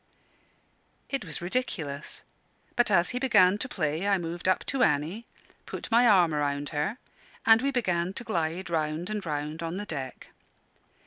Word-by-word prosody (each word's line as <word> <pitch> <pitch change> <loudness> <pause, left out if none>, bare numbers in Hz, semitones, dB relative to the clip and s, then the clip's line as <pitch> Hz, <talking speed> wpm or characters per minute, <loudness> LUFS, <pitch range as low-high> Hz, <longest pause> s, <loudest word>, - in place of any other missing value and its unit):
It 275 -3 -1
was 165 -1 -6
ridiculous, 170 - -3 0.5
but 240 -2 +3
as 175 -3 +3
he 250 - -2
began 205 -7 +4
to 260 - -3
play 160 0 -1
I 200 -1 +4
moved 170 0 -4
up 185 - +2
to 270 -1 -1
Annie, 160 +10 +1 0.4
put - - -6
my 240 +2 +6
arm 180 -7 +5
around 145 -1 -1
her, 155 +10 -2 0.5
and 225 0 +7
we 275 - +1
began 180 -9 0
to 235 - -6
glide 170 -4 -2
round 160 +3 -1
and 210 -2 -3
round 150 0 -3
on 165 +2 -3
the 205 - -4
deck. 135 -8 -6
175 Hz, 165 wpm, -28 LUFS, 155-215 Hz, 0.5 s, and